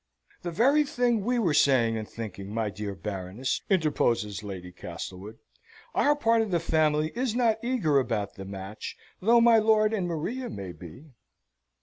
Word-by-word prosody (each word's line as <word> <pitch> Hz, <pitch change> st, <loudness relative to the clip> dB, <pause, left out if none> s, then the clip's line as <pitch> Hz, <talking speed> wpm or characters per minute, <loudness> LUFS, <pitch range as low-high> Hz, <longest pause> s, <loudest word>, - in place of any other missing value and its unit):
"The 175 Hz, -, -4 dB
very 265 Hz, -, +4 dB
thing 245 Hz, -6 st, 0 dB
we 245 Hz, +3 st, +1 dB
were 185 Hz, -10 st, +2 dB
saying 125 Hz, -6 st, +4 dB
and 110 Hz, -1 st, -5 dB
thinking, 100 Hz, -3 st, -7 dB
my 110 Hz, -1 st, -1 dB
dear 100 Hz, 0 st, -5 dB
Baroness!" 95 Hz, +6 st, -3 dB
interposes 120 Hz, -, +1 dB
Lady 95 Hz, -3 st, -7 dB
Castlewood. 90 Hz, +4 st, -8 dB, 0.6 s
"Our 295 Hz, +1 st, +3 dB
part 230 Hz, -5 st, +3 dB
of 220 Hz, -, -1 dB
the 175 Hz, -2 st, +1 dB
family 155 Hz, -1 st, +1 dB
is 240 Hz, -1 st, -1 dB
not 230 Hz, -3 st, +1 dB
eager 210 Hz, -, +2 dB
about 110 Hz, -6 st, -2 dB
the 95 Hz, -, -9 dB
match, 95 Hz, +2 st, -7 dB, 0.2 s
though 230 Hz, +5 st, +5 dB
my 230 Hz, -1 st, +6 dB
lord 215 Hz, 0 st, +3 dB
and 190 Hz, -5 st, -1 dB
Maria 225 Hz, +10 st, -3 dB
may 95 Hz, -, -6 dB
be." 90 Hz, -, -12 dB
150 Hz, 160 wpm, -27 LUFS, -, 0.6 s, my